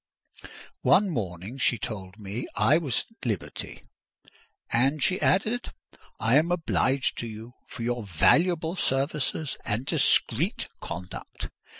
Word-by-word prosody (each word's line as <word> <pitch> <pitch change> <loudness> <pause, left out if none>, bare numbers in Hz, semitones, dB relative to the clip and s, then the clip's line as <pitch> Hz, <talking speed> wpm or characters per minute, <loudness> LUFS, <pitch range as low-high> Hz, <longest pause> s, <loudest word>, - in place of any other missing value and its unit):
One 195 0 +4
morning 100 - -4
she 120 -1 +3
told 95 -3 -6
me 105 +3 -5
I 155 +4 +4
was 140 -8 0
at 225 - -24
liberty. 110 -8 -4 0.9
"And," 135 +5 +2
she 185 - +2
added, 220 +6 +1 0.5
"I 115 +5 +4
am 165 +3 +3
obliged 140 -6 +1
to 120 - -3
you 110 +2 -8 0.2
for 120 - -7
your 120 0 -1
valuable 160 - +3
services 140 0 0
and 115 +4 -1
discreet - - +2
conduct! 90 +2 -7
130 Hz, 120 wpm, -27 LUFS, 110-160 Hz, 0.9 s, One